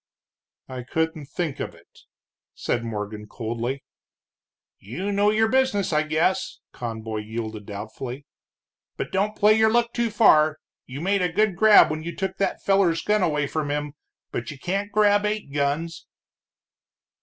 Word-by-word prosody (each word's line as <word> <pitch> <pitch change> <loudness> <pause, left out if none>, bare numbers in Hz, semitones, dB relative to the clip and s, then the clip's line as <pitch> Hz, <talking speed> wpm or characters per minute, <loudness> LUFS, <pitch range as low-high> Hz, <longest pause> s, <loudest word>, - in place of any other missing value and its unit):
"I 130 -1 -6
couldn't 160 +3 -2
think 155 -1 -3
of - - -5
it," - - -21 0.6
said 120 - -1
Morgan, 105 -1 -5
coldly. 120 +5 -4 1.0
"You 175 - -4
know 205 +1 +3
your 220 +1 +3
business, 220 -7 +1
I 150 - +3
guess," 160 +5 0
Conboy 110 -2 -5
yielded, 110 -1 -5
doubtfully, 115 +6 -7 0.7
"but - - -4
don't 205 +3 0
play 210 +1 +6
your 220 0 +4
luck 235 +1 +1
too 235 -1 0
far. 155 -8 +5 0.3
You 130 +3 -7
made 195 +2 +1
a 180 -2 +1
good 210 +1 +2
grab 210 -3 +7
when 155 0 -3
you 170 +2 -6
took 190 -1 -3
that 195 - -1
feller's 195 -4 +2
gun 210 0 +2
away 150 -5 +1
from 150 +1 -3
him, 145 0 -2 0.4
but 120 - -4
you 145 - -7
can't 195 +7 -2
grab 205 0 +4
eight 210 -8 -2
guns." 145 +3 -2
160 Hz, 155 wpm, -24 LUFS, 130-205 Hz, 1.0 s, grab